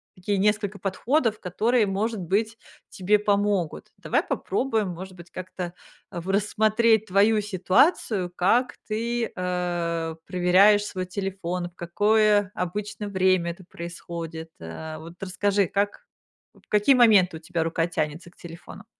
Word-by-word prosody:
такие 190 Hz, +2 st, -2 dB
несколько 210 Hz, 0 st, 0 dB
подходов, 225 Hz, +4 st, 0 dB
которые, 220 Hz, +6 st, +1 dB
может 205 Hz, +3 st, -2 dB
быть, 210 Hz, +6 st, -1 dB, 0.3 s
тебе 205 Hz, +3 st, +2 dB
помогут. 205 Hz, -4 st, 0 dB
Давай -, -, 0 dB
попробуем, 225 Hz, -6 st, -1 dB
может 185 Hz, +2 st, -8 dB
быть, 175 Hz, -1 st, -13 dB
как-то 185 Hz, -1 st, -6 dB, 0.4 s
в 175 Hz, +2 st, -6 dB
рассмотреть 215 Hz, +2 st, +2 dB
твою 210 Hz, +3 st, +3 dB
ситуацию, 195 Hz, -, +1 dB
как 235 Hz, +8 st, +2 dB
ты, 230 Hz, +2 st, -2 dB
а, 175 Hz, -3 st, -2 dB
проверяешь 190 Hz, +4 st, +4 dB
свой 185 Hz, -3 st, -4 dB
телефон, 180 Hz, -2 st, -4 dB
в 175 Hz, -, -32 dB
какое 205 Hz, +3 st, +2 dB
обычно 205 Hz, +3 st, -4 dB
время 185 Hz, -3 st, +2 dB
это 180 Hz, +2 st, -12 dB
происходит, 170 Hz, -1 st, -7 dB
а, 155 Hz, -, -7 dB
вот 165 Hz, +1 st, -10 dB
расскажи, 195 Hz, 0 st, +1 dB
как, 205 Hz, +1 st, -2 dB, 0.5 s
в -, -, -24 dB
какие 210 Hz, +6 st, +4 dB
моменты 200 Hz, -8 st, +5 dB
у -, -, -11 dB
тебя 170 Hz, 0 st, -2 dB
рука 165 Hz, 0 st, 0 dB
тянется 165 Hz, +1 st, -3 dB
к -, -, -30 dB
телефону. 170 Hz, +4 st, -11 dB
190 Hz, 135 wpm, -25 LUFS, 175-210 Hz, 0.5 s, моменты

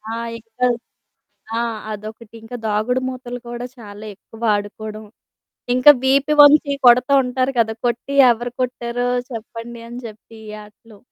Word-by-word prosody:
ఆ! -, -, -4 dB, 0.2 s
ఇంకా 230 Hz, +3 st, -3 dB, 0.9 s
ఆ! -, -, +1 dB, 0.3 s
అదొకటి. 215 Hz, +2 st, -10 dB
ఇంకా 245 Hz, +2 st, -7 dB
దాగుడు 220 Hz, +5 st, 0 dB
మూతలు 245 Hz, -1 st, -7 dB
కూడా 240 Hz, +1 st, -5 dB
చాలా 210 Hz, 0 st, -10 dB
ఎక్కువ 225 Hz, +3 st, -17 dB
ఆడుకోవడం, 215 Hz, +1 st, -6 dB, 0.7 s
ఇంకా 255 Hz, +4 st, +8 dB
వీప 275 Hz, +2 st, +3 dB, 0.2 s
ఒంచి 290 Hz, -1 st, +4 dB
కొడతా 250 Hz, +3 st, +6 dB
ఉంటారు 255 Hz, +1 st, -1 dB
కదా! 220 Hz, -1 st, +1 dB
కొట్టి 240 Hz, +4 st, -2 dB, 0.2 s
ఎవరు 240 Hz, +1 st, -5 dB
కొట్టారో 245 Hz, 0 st, -2 dB, 0.2 s
చెప్పండి 230 Hz, +1 st, -8 dB
అని 245 Hz, +1 st, -7 dB
చెప్పి 220 Hz, +1 st, -15 dB
ఈ -, -, -7 dB
ఆటలు. 210 Hz, 0 st, -18 dB
235 Hz, 135 wpm, -20 LUFS, 220-250 Hz, 0.9 s, ఇంకా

